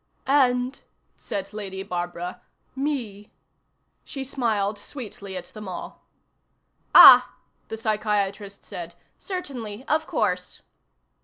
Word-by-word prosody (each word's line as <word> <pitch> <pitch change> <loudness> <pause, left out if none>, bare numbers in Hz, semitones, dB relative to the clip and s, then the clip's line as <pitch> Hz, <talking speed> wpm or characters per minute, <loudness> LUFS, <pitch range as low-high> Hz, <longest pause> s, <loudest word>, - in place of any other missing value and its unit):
"And," 255 -1 +2 0.3
said 200 0 -5
Lady 195 -2 -5
Barbara, 175 -1 -5 0.3
"me." 245 -8 -4 0.7
She 270 - -6
smiled 220 -6 -1
sweetly 200 -7 -8
at 180 - -7
them 215 -2 -9
all. 180 - -7 0.9
"Ah," - - +10 0.3
the 220 - -6
psychiatrist 210 -2 -2
said. 170 -1 -8 0.2
"Certainly. 260 - -6
Of 315 +1 +1
course." 180 -5 -2
210 Hz, 95 wpm, -24 LUFS, 195-255 Hz, 0.9 s, Ah